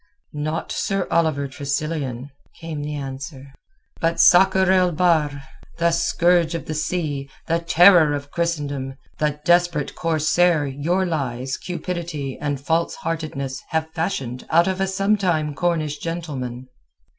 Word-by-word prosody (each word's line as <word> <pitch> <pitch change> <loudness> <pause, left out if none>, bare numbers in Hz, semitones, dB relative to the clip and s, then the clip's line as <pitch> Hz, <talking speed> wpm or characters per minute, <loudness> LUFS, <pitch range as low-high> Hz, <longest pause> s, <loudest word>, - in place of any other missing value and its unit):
"Not 155 +2 -3
Sir 195 -3 -1
Oliver 155 -4 +1
Tressilian, 140 -1 -3 0.3
came 160 -3 -5
the 150 +1 -4
answer, 135 0 -7 0.5
but 165 0 0
Sakr 190 +1 +6
el 185 -1 +4
Bahr, 150 -5 +1 0.3
the 170 0 +2
scourge 170 0 +2
of 165 - -5
the 155 - -4
sea, 150 -3 -2 0.2
the 165 +1 +1
terror 170 -2 +6
of 145 0 -7
Christendom, 145 -6 -2 0.2
the 150 -1 0
desperate 175 -4 +2
corsair 165 0 +2
your 155 +8 0
lies, 130 -6 -2
cupidity, 170 -6 -4
and 145 -2 -2
false 165 +4 0
heartedness 150 -5 -4
have 160 0 -1
fashioned 135 -7 -3
out 170 +3 +4
of 190 0 -1
a 195 - +1
sometime 190 -6 +1
Cornish 155 -2 -1
gentleman." 135 -7 -5
155 Hz, 130 wpm, -22 LUFS, 140-175 Hz, 0.5 s, Sakr